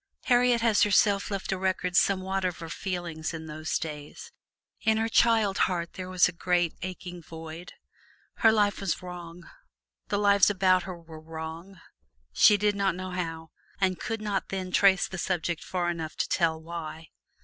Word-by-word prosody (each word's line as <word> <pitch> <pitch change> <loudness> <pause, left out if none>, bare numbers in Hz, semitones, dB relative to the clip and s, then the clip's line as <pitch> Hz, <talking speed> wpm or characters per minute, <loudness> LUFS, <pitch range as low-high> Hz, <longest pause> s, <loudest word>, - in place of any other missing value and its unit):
Harriet 245 -1 +3
has 225 -3 +3
herself 200 0 +3
left 195 -1 -2
on 190 - -4
record 185 -1 -1
somewhat 190 0 +2
of 180 -2 -1
her 165 -2 -8
feelings 170 -3 -4
in 160 0 -7
those 155 0 -3
days. 150 - -7 0.5
In 220 0 +2
her 225 +1 +1
child 225 -3 +3
heart 170 -2 -3
there 185 -1 -7
was 185 -1 +4
a - - -4
great 175 -1 0
aching 180 -1 -7
void. 165 +2 -9 0.6
Her 225 - +5
life 205 -2 +2
was 190 -2 -2
wrong 175 -1 -9 0.6
the 205 - 0
lives 200 -1 +5
about 185 -2 +3
her 175 -2 -7
were 165 -2 -12
wrong 165 +3 -8 0.5
she 205 - +6
did 205 0 +1
not 195 -3 +1
know 185 0 -6
how, 165 -3 -5 0.3
and 185 -2 +1
could 225 -1 -4
not 205 -2 -2
then 185 -1 -4
trace 195 0 +4
the 190 - -7
subject 175 -2 -2
far 175 -2 -1
enough 160 -2 -5
to - - -1
tell 165 -3 +1
why. 160 -1 -7
180 Hz, 170 wpm, -27 LUFS, 165-200 Hz, 0.6 s, she